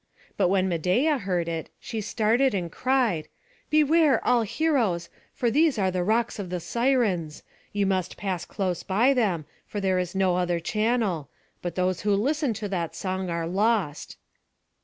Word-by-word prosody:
But 195 Hz, -, +2 dB
when 190 Hz, 0 st, +2 dB
Medeia 190 Hz, -, +1 dB
heard 180 Hz, -5 st, -1 dB
it, 165 Hz, -1 st, -4 dB
she 225 Hz, -2 st, -5 dB
started, 230 Hz, +4 st, +2 dB
and 175 Hz, -3 st, -3 dB
cried: 250 Hz, -11 st, +1 dB, 0.4 s
"Beware, 305 Hz, -1 st, +4 dB
all 245 Hz, -1 st, +4 dB
heroes, 225 Hz, -, 0 dB, 0.2 s
for 240 Hz, -2 st, 0 dB
these 305 Hz, +1 st, +3 dB
are 190 Hz, -2 st, +1 dB
the 180 Hz, -1 st, -1 dB
rocks 220 Hz, +3 st, 0 dB
of 190 Hz, -3 st, -5 dB
the 180 Hz, 0 st, -2 dB
Sirens. 215 Hz, -, 0 dB, 0.3 s
You 200 Hz, -1 st, 0 dB
must 190 Hz, -2 st, -1 dB
pass 185 Hz, -3 st, -3 dB
close 185 Hz, -4 st, -2 dB
by 225 Hz, +8 st, +3 dB
them, 195 Hz, -, 0 dB, 0.2 s
for 205 Hz, -, -4 dB
there 190 Hz, -2 st, +1 dB
is 180 Hz, 0 st, -3 dB
no 190 Hz, -2 st, +2 dB
other 175 Hz, -1 st, 0 dB
channel; 210 Hz, -, 0 dB, 0.3 s
but 175 Hz, -, -4 dB
those 185 Hz, -1 st, 0 dB
who 205 Hz, -1 st, +2 dB
listen 285 Hz, +6 st, +1 dB
to 205 Hz, 0 st, -4 dB
that 175 Hz, -4 st, -3 dB
song 185 Hz, -1 st, -3 dB
are 170 Hz, -1 st, -2 dB
lost." 195 Hz, -4 st, 0 dB
195 Hz, 165 wpm, -26 LUFS, 180-235 Hz, 0.4 s, Beware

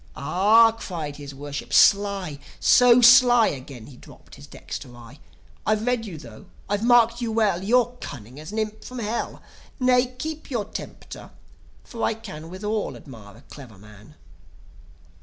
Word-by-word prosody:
"Ah!" 205 Hz, +10 st, +4 dB
cried 165 Hz, -10 st, -7 dB
his 140 Hz, -1 st, -10 dB
Worship. 145 Hz, +1 st, -7 dB
"Sly; 200 Hz, -7 st, +3 dB, 0.2 s
so 245 Hz, 0 st, +5 dB
sly!" 240 Hz, -1 st, +7 dB
(Again 130 Hz, -4 st, -9 dB
he 130 Hz, -1 st, -14 dB
drooped -, -, -17 dB
his -, -, -13 dB
dexter 120 Hz, -, -9 dB
eye) 120 Hz, +4 st, -14 dB, 0.4 s
"I've 215 Hz, +1 st, 0 dB
read 245 Hz, -3 st, -1 dB
you 175 Hz, -5 st, -8 dB
thro'; 115 Hz, -7 st, -13 dB, 0.2 s
I've 205 Hz, +1 st, -2 dB
marked 235 Hz, 0 st, +4 dB
you 235 Hz, -2 st, -2 dB
well. 210 Hz, -5 st, 0 dB
You're 245 Hz, +3 st, +2 dB
cunning 125 Hz, +1 st, -9 dB
as 155 Hz, +4 st, -9 dB
an 215 Hz, -, -6 dB
imp 215 Hz, 0 st, -4 dB
from 255 Hz, -, -9 dB
Hell... 230 Hz, 0 st, -4 dB, 0.4 s
Nay, 250 Hz, 0 st, +3 dB
keep 315 Hz, +3 st, -6 dB
your 235 Hz, -6 st, -2 dB
temper; 215 Hz, -, -9 dB, 0.5 s
for 230 Hz, -, -9 dB
I 225 Hz, -, 0 dB
can 160 Hz, -7 st, -10 dB
Withal 210 Hz, +4 st, -4 dB
admire 110 Hz, -6 st, -13 dB
a -, -, -17 dB
clever 125 Hz, -8 st, -13 dB
man. 105 Hz, +6 st, -17 dB
205 Hz, 160 wpm, -23 LUFS, 140-230 Hz, 0.5 s, sly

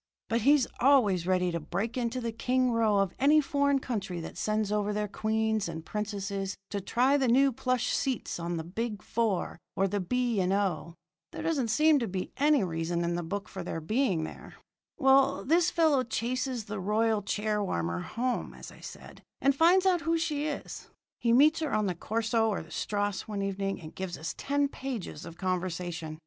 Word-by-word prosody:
But 230 Hz, +1 st, +1 dB
he's 280 Hz, +2 st, +5 dB
always 215 Hz, -10 st, +4 dB
ready 180 Hz, -1 st, +2 dB
to 170 Hz, -, -2 dB
break 195 Hz, +9 st, -3 dB
into 245 Hz, 0 st, -1 dB
the 235 Hz, -2 st, -3 dB
king 255 Hz, +2 st, +1 dB
row 225 Hz, -3 st, +2 dB
of 195 Hz, -2 st, +1 dB
any 295 Hz, +3 st, +5 dB
foreign 280 Hz, -1 st, +2 dB
country 200 Hz, -9 st, -3 dB
that -, -, -8 dB
sends 215 Hz, -1 st, -1 dB
over 210 Hz, 0 st, 0 dB
their 210 Hz, 0 st, -1 dB
queens 220 Hz, -1 st, 0 dB
and 160 Hz, -1 st, -7 dB
princesses 200 Hz, -2 st, -3 dB
to 200 Hz, -, -2 dB
try 255 Hz, +8 st, +2 dB
the 265 Hz, -2 st, +1 dB
new 270 Hz, +3 st, +5 dB
plush 250 Hz, 0 st, 0 dB
seats 260 Hz, -9 st, -2 dB
on 170 Hz, 0 st, -3 dB
the 160 Hz, -, -3 dB
Big 210 Hz, +5 st, -4 dB
Four 215 Hz, -7 st, -1 dB, 0.2 s
or 195 Hz, -, +2 dB
the 205 Hz, +2 st, -1 dB
B. 240 Hz, +3 st, 0 dB
and 185 Hz, 0 st, +1 dB
O. 175 Hz, -5 st, -1 dB, 0.4 s
There -, -, -6 dB
doesn't 290 Hz, -7 st, 0 dB
seem 300 Hz, +6 st, +4 dB
to 235 Hz, -, -2 dB
be 185 Hz, 0 st, -4 dB
any 290 Hz, -4 st, +4 dB
other 180 Hz, -, -3 dB
reason 165 Hz, +1 st, -1 dB
in 170 Hz, 0 st, 0 dB
the 175 Hz, -, -1 dB
book 200 Hz, +5 st, -4 dB
for 190 Hz, -, -7 dB
their 170 Hz, -1 st, -4 dB
being 190 Hz, -, 0 dB
here. -, -, -10 dB, 0.4 s
"Well, 270 Hz, -1 st, +4 dB
this 335 Hz, +4 st, +3 dB
fellow 315 Hz, -5 st, +3 dB
chases 255 Hz, -1 st, -2 dB
the 210 Hz, -1 st, -5 dB
royal 215 Hz, +2 st, +1 dB
chair 210 Hz, +1 st, -1 dB
warmer 85 Hz, -, -2 dB
home, 245 Hz, -, -3 dB
as -, -, -10 dB
I -, -, -15 dB
said, -, -, -11 dB, 0.2 s
and 275 Hz, 0 st, +3 dB
finds 350 Hz, +5 st, +5 dB
out 360 Hz, -3 st, +3 dB
who 330 Hz, +3 st, +1 dB
she 305 Hz, -2 st, -1 dB
is. 295 Hz, -, -6 dB, 0.3 s
He 235 Hz, -, +1 dB
meets 300 Hz, +7 st, +5 dB
her 315 Hz, -3 st, -2 dB
on 215 Hz, -1 st, +1 dB
the 185 Hz, -, 0 dB
corso 225 Hz, +4 st, 0 dB
or 205 Hz, -, -2 dB
the -, -, -17 dB
strasse 205 Hz, -2 st, -2 dB
one 205 Hz, -2 st, -3 dB
evening 195 Hz, 0 st, -2 dB
and 155 Hz, -2 st, -10 dB
gives 185 Hz, -2 st, -5 dB
us 160 Hz, +3 st, -4 dB
ten 285 Hz, 0 st, 0 dB
pages 255 Hz, -, -6 dB
of 165 Hz, -, -10 dB
conversation. 175 Hz, -3 st, -3 dB
215 Hz, 200 wpm, -29 LUFS, 185-260 Hz, 0.4 s, he's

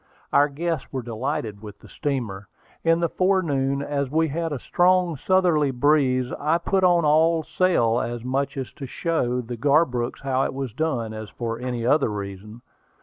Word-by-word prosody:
Our 145 Hz, +1 st, +5 dB
guests 160 Hz, +1 st, -3 dB
were 130 Hz, -2 st, -4 dB
delighted 115 Hz, -3 st, -4 dB
with 105 Hz, -2 st, -10 dB
the -, -, -16 dB
steamer. 115 Hz, -9 st, -4 dB, 0.4 s
In 165 Hz, +1 st, +3 dB
the 170 Hz, -, +2 dB
forenoon, 145 Hz, -8 st, +1 dB
as 140 Hz, -2 st, -2 dB
we 160 Hz, +2 st, +1 dB
had 165 Hz, +2 st, -2 dB
a 145 Hz, -, -2 dB
strong 180 Hz, +4 st, +2 dB
southerly 170 Hz, -2 st, +2 dB
breeze, 130 Hz, -1 st, +2 dB
I 155 Hz, +3 st, +2 dB
put 190 Hz, +2 st, 0 dB
on 175 Hz, -3 st, +4 dB
all 160 Hz, +2 st, +3 dB
sail, 125 Hz, -12 st, +2 dB
as 120 Hz, -1 st, -4 dB
much 135 Hz, +2 st, -1 dB
to 135 Hz, +1 st, -6 dB
show 125 Hz, -5 st, -1 dB
the 120 Hz, 0 st, -7 dB
Garbrooks 130 Hz, -2 st, +1 dB
how 135 Hz, -1 st, +1 dB
it -, -, -4 dB
was 135 Hz, -5 st, -4 dB
done, 120 Hz, -8 st, -2 dB
as 110 Hz, -1 st, -7 dB
for 115 Hz, +2 st, -4 dB
any 125 Hz, -2 st, -3 dB
other 140 Hz, 0 st, +3 dB
reason. 105 Hz, +3 st, -7 dB
140 Hz, 170 wpm, -24 LUFS, 120-160 Hz, 0.4 s, Our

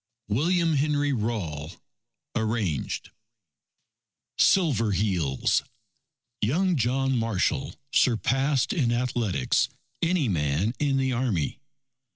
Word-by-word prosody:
William 165 Hz, -, +2 dB
Henry 145 Hz, 0 st, +1 dB
Rawle 90 Hz, -, -3 dB, 0.6 s
(Arranged) 110 Hz, -, -2 dB, 1.3 s
SILVER 125 Hz, -, +3 dB
HEELS 90 Hz, -8 st, +1 dB, 0.8 s
Young 175 Hz, -, +2 dB
John 135 Hz, +1 st, +1 dB
Marshall 115 Hz, +4 st, 0 dB, 0.2 s
surpassed 135 Hz, -, +2 dB
in 135 Hz, -, +1 dB
athletics, 120 Hz, -, 0 dB, 0.3 s
any 165 Hz, -4 st, +2 dB
man 80 Hz, +3 st, 0 dB
in 140 Hz, -2 st, +1 dB
the 130 Hz, -1 st, +1 dB
Army. 115 Hz, -, -1 dB
120 Hz, 85 wpm, -26 LUFS, 100-140 Hz, 1.3 s, SILVER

